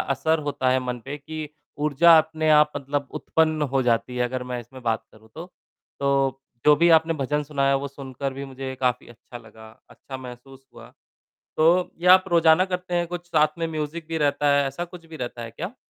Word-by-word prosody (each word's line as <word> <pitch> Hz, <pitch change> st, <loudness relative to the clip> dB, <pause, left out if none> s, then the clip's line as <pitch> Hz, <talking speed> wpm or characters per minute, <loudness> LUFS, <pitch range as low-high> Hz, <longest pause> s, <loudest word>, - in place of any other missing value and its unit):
असर 155 Hz, +4 st, 0 dB
होता 130 Hz, -2 st, 0 dB
है 130 Hz, -, +3 dB
मन 125 Hz, -1 st, -3 dB
पे 140 Hz, +2 st, -5 dB
कि 155 Hz, +1 st, -7 dB, 0.3 s
ऊर्जा 150 Hz, +3 st, +5 dB
अपने 155 Hz, 0 st, -1 dB
आप 150 Hz, 0 st, +5 dB
मतलब 140 Hz, 0 st, -3 dB
उत्पन्न 155 Hz, -1 st, 0 dB
हो 135 Hz, -, +3 dB
जाती 125 Hz, +1 st, 0 dB
है 125 Hz, -, +1 dB
अगर 125 Hz, +1 st, -3 dB
मैं 125 Hz, -1 st, -3 dB
इसमें 130 Hz, +2 st, -13 dB
बात 115 Hz, -2 st, -1 dB
करूँ 110 Hz, +1 st, -20 dB
तो। 170 Hz, +2 st, -8 dB, 0.5 s
तो, 135 Hz, -1 st, +1 dB, 0.2 s
जो 150 Hz, -, +7 dB
भी 170 Hz, +3 st, +4 dB
आपने 160 Hz, +1 st, +1 dB
भजन 150 Hz, 0 st, -1 dB
सुनाया 140 Hz, -2 st, 0 dB
वो 140 Hz, +1 st, -4 dB
सुनकर 135 Hz, 0 st, -6 dB
भी 135 Hz, +1 st, -7 dB
मुझे 135 Hz, 0 st, -7 dB
काफ़ी 125 Hz, -2 st, -1 dB
अच्छा 120 Hz, +1 st, -12 dB
लगा, 110 Hz, -1 st, -15 dB, 0.2 s
अच्छा 135 Hz, -, -10 dB
महसूस 130 Hz, +1 st, -12 dB
हुआ, -, -, -14 dB, 0.7 s
तो 170 Hz, +3 st, +3 dB
ये 180 Hz, -, 0 dB
आप 185 Hz, +1 st, +8 dB
रोज़ाना 170 Hz, +1 st, +4 dB
करते 180 Hz, -1 st, -5 dB
हैं 175 Hz, 0 st, 0 dB
कुछ 175 Hz, 0 st, -6 dB
साथ 155 Hz, -1 st, +1 dB
में 165 Hz, -1 st, -2 dB
म्यूज़िक 155 Hz, +1 st, -5 dB
भी 165 Hz, 0 st, -3 dB
रहता 145 Hz, -1 st, +1 dB
है, 140 Hz, -, +2 dB
ऐसा 155 Hz, +6 st, -5 dB
कुछ 175 Hz, -1 st, -13 dB
भी 165 Hz, 0 st, -11 dB
रहता 120 Hz, -1 st, -6 dB
है 115 Hz, -1 st, -7 dB
क्या? 180 Hz, -, -7 dB
145 Hz, 210 wpm, -24 LUFS, 130-160 Hz, 0.7 s, आप